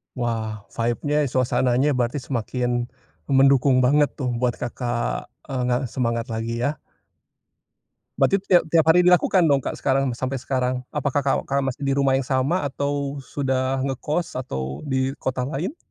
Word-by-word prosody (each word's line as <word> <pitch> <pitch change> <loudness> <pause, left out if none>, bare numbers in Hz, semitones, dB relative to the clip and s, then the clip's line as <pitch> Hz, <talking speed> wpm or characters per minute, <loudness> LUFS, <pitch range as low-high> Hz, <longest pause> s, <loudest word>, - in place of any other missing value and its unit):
Wah 110 -4 -3
vibe-nya 145 +6 0
suasananya 130 +2 +2
berarti 125 +3 -1
semakin, 120 -1 -2 0.4
mendukung 135 -1 +4
banget 145 +2 +3
tuh 130 -3 -2
buat 125 -1 +1
Kakak, 120 0 -3 0.2
eee, 130 -2 -2
ngerasa 125 0 0
semangat 115 -2 -1
lagi 115 +2 -3
ya. 150 +4 -1 1.4
Berarti 195 -1 +3
tiap 175 -3 +5
tiap 165 - +7
hari 180 +2 +6
dilakukan 180 0 +4
dong 140 -3 +3
Kak - - -4
sekarang 135 0 +1
sampai 130 -1 -3
sekarang? 130 -1 -1
Apakah 145 -1 -1
Kakak 140 0 0
masih 135 +1 -3
di 135 - +2
rumah 135 -1 +2
yang 135 - -2
sama 140 +5 0
atau 140 0 -2
sudah 130 -1 -1
ngekos 150 +5 -2
atau 65 - -4
di 130 0 0
kota 130 -1 -1
lain? 170 - -3
130 Hz, 145 wpm, -23 LUFS, 125-140 Hz, 1.4 s, tiap